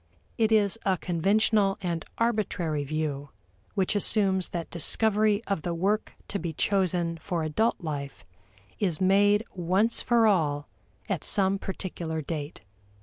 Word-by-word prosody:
It 225 -1 +1
is 215 0 +3
a 190 -2 +1
conventional 195 +4 +2
and 170 -4 -3
arbitrary 190 -10 0
view 145 -1 -3 0.5
which 195 0 +1
assumes 195 -2 +2
that 170 -2 -5
discovery 215 +5 +2
of 200 -5 -1
the 170 +2 -3
work 200 +5 0 0.2
to 200 - -2
be 165 -1 -4
chosen 175 -2 0
for 165 0 -3
adult 185 +10 0
life 145 -4 -5 0.5
is 180 -7 0
made 205 +3 +4
once 190 +6 +1
for 235 -2 +3
all 150 -8 +1 0.4
at - - -2
some 195 -1 +2
particular 170 -4 -4
date. 150 0 -5
185 Hz, 135 wpm, -27 LUFS, 160-205 Hz, 0.5 s, made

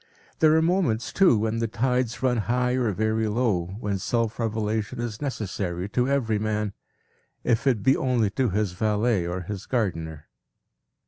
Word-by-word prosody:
There 155 0 +5
are 160 - +3
moments 165 - +1
too, 190 - +5
when 110 +2 -1
the 115 - 0
tides 125 +1 -1
run 125 -2 +2
high 125 +3 +1
or 125 -3 +1
very 110 +2 0
low, 105 -6 0
when 100 -3 -2
self 115 +3 -1
revelation 110 -1 -2
is 115 -3 -4
necessary 95 -9 -3
to 125 +4 +1
every 115 -6 +1
man, 105 -1 -1 0.7
if 115 +2 +1
it 115 -7 +2
be 135 +4 +5
only 120 -6 +1
to 130 +2 +1
his 105 0 0
valet 105 0 +1
or 90 +1 -3
his 100 +2 -6
gardener. 80 - -2
110 Hz, 160 wpm, -25 LUFS, 105-125 Hz, 0.7 s, There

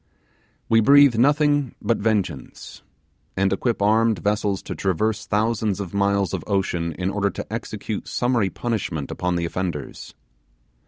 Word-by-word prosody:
We 115 - +4
breathe 140 +2 +6
nothing 145 0 +2
but 115 - 0
vengeance, 105 -3 -3 0.6
and 95 0 +2
equip 115 0 -1
armed 110 +1 +3
vessels 100 +1 -1
to - - -5
traverse 100 +3 -1
thousands 105 -1 0
of 100 -3 -6
miles 100 -2 +1
of 90 -4 -3
ocean 90 -5 -1
in 95 +3 -2
order 100 -1 0
to - - -7
execute - - -5
summary 120 -5 +1
punishment 95 - -3
upon 90 0 -2
the 85 -1 -1
offenders. 85 -4 -5
100 Hz, 140 wpm, -23 LUFS, 95-115 Hz, 0.6 s, breathe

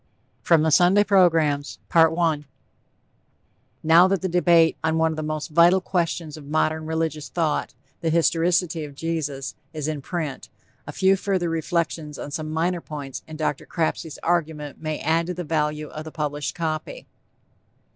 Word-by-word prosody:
FROM 165 -3 +4
THE 160 - +2
SUNDAY 180 +6 +5
PROGRAMS 165 -8 +2 0.2
I 165 -2 +3 1.4
Now 165 +3 +6
that 190 -1 -1
the - - +1
debate 170 -2 +4
on 160 0 +1
one 160 0 +2
of - - -4
the 155 - -4
most 155 +1 -4
vital 170 +4 +5
questions 170 -4 -2
of 150 - -11
modern 155 +1 0
religious 160 -2 -2
thought 160 -3 -1 0.2
The 165 - -1
Historicity 170 0 +1
of 145 -2 -9
Jesus 145 -4 -3 0.2
is 155 -2 -4
in 155 -2 -3
print, 155 -2 -5 0.4
a - - -5
few 190 +1 +3
further 190 -3 -1
reflections 165 -2 -2
on 145 - -7
some 155 +1 -4
minor 170 +3 -1
points 145 -4 -7
in 155 - -8
Dr. 150 -2 -2
Crapsey's 160 -2 -2
argument 155 -4 -1
may 155 -1 -3
add 165 +2 +1
to 180 - -3
the 180 - -4
value 150 -1 -1
of 155 - -7
the 160 - -9
published 150 -2 -3
copy. 165 - -4
160 Hz, 160 wpm, -23 LUFS, 155-170 Hz, 1.4 s, Now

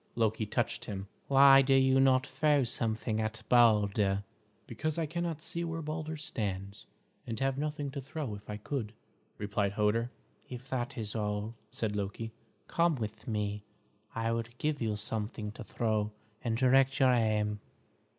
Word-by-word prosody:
Loki 110 -1 +1
touched - - -1
him. 100 -1 -5 0.2
"Why 135 0 +8
do 135 0 +3
you 130 0 +5
not 130 -1 +4
throw 150 -2 +2
something 110 -1 -1
at 110 0 -3
Balder?" 105 -4 +4 0.4
"Because 155 0 -3
I 165 - +1
cannot 165 0 -3
see 170 0 -2
where 165 -1 -3
Balder 155 +1 -4
stands, 100 -8 -4 0.4
and 115 -1 -3
have 135 0 +1
nothing 150 0 -3
to 140 0 -5
throw 135 -3 -4
if 100 +1 -10
I 105 - -3
could," 110 -1 -4 0.4
replied 100 -1 -1
Hoder. 110 +3 +1 0.4
"If 125 +1 -8
that 125 -2 -2
is 110 -2 -4
all," 105 0 -2 0.2
said 105 -2 -2
Loki, 105 +3 -3 0.4
"come 170 -1 +2
with 110 -4 -6
me. 105 -2 -2 0.5
I 115 0 0
will 115 0 -1
give 150 0 -1
you 110 -2 0
something 105 0 -3
to 115 - -9
throw, 110 -1 -1 0.3
and 115 -2 0
direct 135 +2 +4
your 130 -2 +6
aim." 105 -3 +1
115 Hz, 160 wpm, -31 LUFS, 105-135 Hz, 0.5 s, Why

